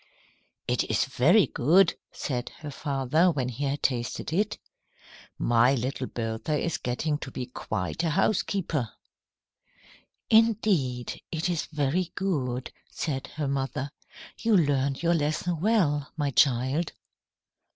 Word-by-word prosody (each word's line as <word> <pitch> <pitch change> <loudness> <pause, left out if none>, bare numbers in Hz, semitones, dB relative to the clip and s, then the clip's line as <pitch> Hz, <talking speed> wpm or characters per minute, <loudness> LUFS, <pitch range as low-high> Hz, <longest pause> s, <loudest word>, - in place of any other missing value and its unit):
"It - - +1
is - - +1
very 175 - +4
good," 175 +10 +4 0.2
said 125 -3 -3
her 150 -2 -6
father 140 +4 +1
when 135 -6 -1
he 130 +4 -3
had 140 +1 -2
tasted 125 +3 -1
it. 205 +4 0 0.8
"My 120 +3 +4
little 130 +1 -2
Bertha 115 +6 -2
is 170 - -1
getting 145 +5 -1
to 135 - -6
be 125 -1 -5
quite 110 - -3
a 165 - +1
housekeeper." 165 - 0 1.4
"Indeed, 200 - +2
it 165 +2 -1
is 170 -3 -1
very 155 +4 -1
good," 130 -10 -2 0.2
said 135 -5 -3
her 150 -2 -1
mother. 135 0 -2 0.5
"You 225 -3 +3
learned 140 -3 +1
your 170 0 +3
lesson 155 +2 0
well, 170 -10 +2
my 145 -2 0
child." 130 +5 +2
145 Hz, 125 wpm, -27 LUFS, 130-170 Hz, 1.4 s, very